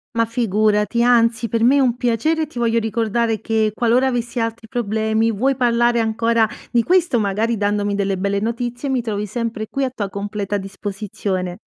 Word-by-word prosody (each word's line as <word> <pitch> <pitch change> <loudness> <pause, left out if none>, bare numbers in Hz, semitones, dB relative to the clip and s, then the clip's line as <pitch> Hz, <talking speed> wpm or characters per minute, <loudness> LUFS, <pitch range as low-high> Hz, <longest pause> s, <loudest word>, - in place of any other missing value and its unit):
Ma 230 0 +3
figurati, 215 0 +1
anzi 230 -1 +3
per 230 +1 0
me 255 +4 +5
è - - +4
un 250 -3 +2
piacere, 250 +7 0
ti 280 - -13
voglio 230 -1 +2
ricordare 225 0 0
che 220 -1 0
qualora 245 +3 +2
avessi 240 -1 -2
altri 230 0 -3
problemi, 220 -1 0
vuoi 260 +6 +1
parlare 240 -1 +2
ancora 225 0 +2 0.2
di 240 - +3
questo, 345 -4 +2
magari 215 +3 0
dandomi 205 -1 0
delle 200 -1 -1
belle 200 +1 0
notizie, 240 +4 -3
mi 260 -2 +1
trovi 210 -2 -3
sempre 225 0 -3
qui 275 - -2
a 260 - -1
tua 205 -6 -3
completa 205 0 -3
disposizione. 195 -2 -4
230 Hz, 175 wpm, -20 LUFS, 210-240 Hz, 0.2 s, me